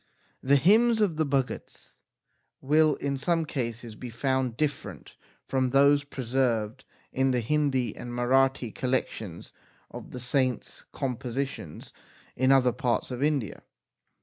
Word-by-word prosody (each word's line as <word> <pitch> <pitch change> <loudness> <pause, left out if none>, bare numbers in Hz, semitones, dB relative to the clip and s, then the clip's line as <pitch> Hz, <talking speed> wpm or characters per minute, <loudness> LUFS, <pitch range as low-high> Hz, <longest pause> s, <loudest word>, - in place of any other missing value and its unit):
The 140 +2 +4
hymns 220 - +4
of 195 -7 +1
the 155 -2 +1
Bhagats 135 -2 -3 0.6
will 155 +2 +3
in 140 -1 -3
some 165 +3 +1
cases 120 -5 -4
be 125 +2 -8
found 130 0 -1
different 150 -3 -4 0.3
from 130 -1 +1
those 140 +2 +4
preserved 125 -3 -1 0.3
in 135 +1 +2
the 125 -1 +1
Hindi 135 0 0
and 120 - -8
Marathi 125 0 +1
collections 115 -8 -3 0.4
of - - -9
the 125 - -7
saints 125 -1 -1
com 130 -3 -3
positions 125 - -5 0.4
in 130 +1 +3
other 130 -2 +5
parts 120 +1 -1
of 125 +1 -4
India. 145 -7 -1
130 Hz, 130 wpm, -27 LUFS, 125-140 Hz, 0.6 s, other